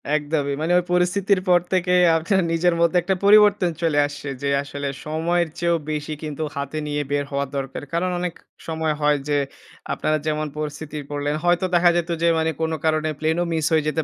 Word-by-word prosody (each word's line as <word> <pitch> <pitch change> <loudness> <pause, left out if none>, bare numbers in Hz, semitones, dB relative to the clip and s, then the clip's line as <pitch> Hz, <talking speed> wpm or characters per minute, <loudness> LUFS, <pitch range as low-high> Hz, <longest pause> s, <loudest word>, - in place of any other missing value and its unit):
একদমই। 145 -1 -1
মানে 160 +2 0
ওই - - -3
পরিস্থিতির 185 +2 +2
পর 175 - +6
থেকে 180 -1 +2 0.2
আপনার 190 +4 +1
নিজের 170 +1 +2
মধ্যে 170 +1 +3
একটা 190 +3 0
পরিবর্তন 205 -3 +6
চলে 155 -3 +2
আসছে 145 0 -9
যে, 140 - -1
আসলে 145 0 -5 0.2
সময়ের 170 +3 0
চেয়েও 170 -1 +2
বেশি 150 0 -3
কিন্তু 155 0 -4
হাতে 140 +2 -4
নিয়ে 145 0 -1
বের 145 0 0
হওয়া 140 0 -1
দরকার। 135 0 -5
কারণ 180 +2 0
অনেক 180 -1 -2 0.3
সময় 160 -1 -1
হয় 150 0 +3
যে 145 - +2 0.6
আপনারা 155 - 0
যেমন 155 0 -1
পরিস্থিতি 150 0 -5
পড়লেন 145 0 -2
হয়তো 175 +1 +2
দেখা 175 0 +5
যেত 170 0 -2
যে, 170 - +3
মানে 160 0 +1
কোন 160 0 0
কারণে 155 0 +1
প্লেনও 160 +3 +1
মিস 160 -2 0
হয়ে 155 -2 +2
যেতে 160 +1 0
160 Hz, 190 wpm, -22 LUFS, 150-175 Hz, 0.6 s, পর